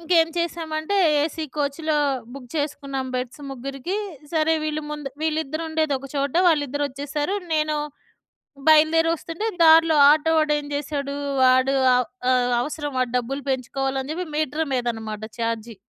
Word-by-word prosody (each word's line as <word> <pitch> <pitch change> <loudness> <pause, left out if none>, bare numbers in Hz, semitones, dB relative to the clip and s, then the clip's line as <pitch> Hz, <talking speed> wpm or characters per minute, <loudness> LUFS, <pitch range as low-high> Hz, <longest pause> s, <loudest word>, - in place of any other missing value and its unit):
ఇంకేంచేశామంటే, 330 0 0 0.3
AC 320 +1 -3
కోచ్‌లో 300 +2 -1 0.4
book 255 -3 -10
చేసుకున్నాం 280 -3 -3
beds 250 +3 -4
ముగ్గురికి. 275 +8 -5 0.4
సరే 320 0 +2
వీళ్ళు 310 0 -2
ముందు 295 -2 -5
వీళ్ళిద్దరుండేది 315 0 -1
ఒకచోట. 275 +1 -3
వాళ్ళిద్దరొచ్చేసారు. 290 +2 -1 0.2
నేను 305 -1 +1 0.9
బయలుదేరి 315 +1 +5
వస్తుంటే, 335 +6 -5 0.2
దారిలో 320 -1 +6
ఆటో 310 +2 +3
వాడు 305 -1 +2
ఏంజెసాడు, 285 -1 -4 0.3
వాడు 255 +1 +4 0.2
ఆహ్, 250 -1 +2 0.2
ఆహ్, 250 -1 +2
అవసరం 290 +2 -4
వాడు 250 -2 0
డబ్బులు 275 +4 -4
పెంచుకోవాలని 265 +1 -2
చెప్పి 360 +2 -3
మీటర్ 310 +1 0
మీద 250 -2 0
అనమాట 220 -1 -7 0.2
ఛార్జి. 230 0 -3
290 Hz, 120 wpm, -23 LUFS, 270-315 Hz, 0.9 s, దారిలో